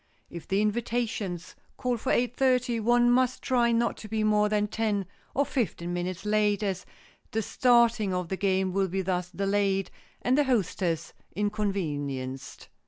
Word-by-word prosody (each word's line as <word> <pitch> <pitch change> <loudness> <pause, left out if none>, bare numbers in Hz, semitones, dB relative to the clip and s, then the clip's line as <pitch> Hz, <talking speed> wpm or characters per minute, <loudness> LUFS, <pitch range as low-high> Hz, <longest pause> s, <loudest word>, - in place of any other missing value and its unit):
If 170 -2 -8
the 195 +2 +2
invitations 215 -5 -2 0.2
call 250 -2 0
for 225 - -2
eight 245 0 +1
thirty, 250 -3 +2
one 240 +2 +4
must 255 0 +2
try 240 -3 +2
not 235 0 +1
to 215 - -9
be 215 0 -1
more 210 0 +3
than 210 -1 +2
ten 210 -2 -1 0.3
or 280 +2 +3
fifteen 175 - -2
minutes 180 +2 -3
late, 210 -1 +2
as 190 -2 -2 0.4
the 220 0 -1
starting 235 -4 +3
of 180 -1 -2
the 190 - -1
game 190 -1 +1
will 195 0 +1
be 190 +1 -2
thus 180 -1 -1
delayed 195 0 0 0.3
and 250 - +3
the 295 0 +3
hostess 180 - 0 0.2
inconvenienced. 150 -11 -3
210 Hz, 160 wpm, -28 LUFS, 185-235 Hz, 0.4 s, one